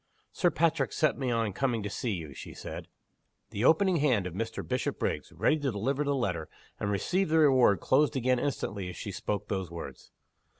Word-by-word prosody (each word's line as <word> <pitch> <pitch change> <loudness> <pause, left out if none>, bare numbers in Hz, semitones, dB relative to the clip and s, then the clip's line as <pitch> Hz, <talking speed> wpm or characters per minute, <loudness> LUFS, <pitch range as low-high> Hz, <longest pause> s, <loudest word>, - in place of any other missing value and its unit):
"Sir 175 - +2
Patrick 165 -1 +1
set 155 -3 +2
me 130 -2 -2
on 115 -4 0
coming 120 -1 0
to 105 +4 -3
you," 80 -8 -4
she - - -9
said. - - -7 0.6
The 105 0 -2
opening 175 +5 +4
hand 130 - +2
of 90 - -4
Mr. 115 +4 -4
Bishopriggs 125 -1 -2
ready 155 - +2
to 140 -2 -1
deliver 130 +8 -1
the 140 -1 0
letter, 90 -11 -2 0.3
and 100 - -1
receive 170 - 0
the 160 - +3
reward 130 - +5
closed 145 +3 +3
again 130 -1 +2
instantly 100 -9 -2
as 90 - -8
she 100 - -5
spoke 105 +1 -3
those 95 -3 -2
words. 85 -1 -8
120 Hz, 185 wpm, -29 LUFS, 100-145 Hz, 0.6 s, reward